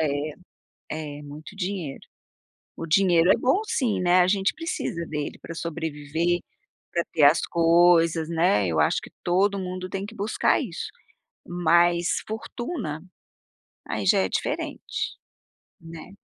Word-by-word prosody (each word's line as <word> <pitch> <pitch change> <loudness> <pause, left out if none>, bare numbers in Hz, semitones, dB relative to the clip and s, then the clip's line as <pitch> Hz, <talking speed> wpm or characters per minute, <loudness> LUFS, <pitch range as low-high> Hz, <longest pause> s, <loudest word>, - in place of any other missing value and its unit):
É, 150 0 -1 0.9
é, - - -11
muito 150 +5 -10
dinheiro. 180 -7 -4 0.7
O 165 - -5
dinheiro 175 0 +4
é - - +6
bom 265 +11 +2
sim, 250 - 0
né, 180 0 +4
a 180 - +5
gente 195 0 +2
precisa 315 - -3
dele 150 -2 -4
pra 165 - -8
sobreviver, 160 +1 -2 0.5
pra 170 -1 0
ter 155 - +1
as 145 +3 +6
coisas, 165 -1 +4
né, 165 - +2
eu 80 -2 -1
acho 75 - +3
que - - -11
todo 195 +3 +2
mundo 185 0 -5
tem 195 +1 -4
que 225 - -11
buscar 210 +1 +1
isso. - - -5 0.6
Mas, 175 0 +2
fortuna, 220 - -5 0.9
aí 105 - -2
já - - +5
é 95 - +1
diferente, - - -3 0.6
né? 165 +3 -11
170 Hz, 135 wpm, -25 LUFS, 155-190 Hz, 0.9 s, é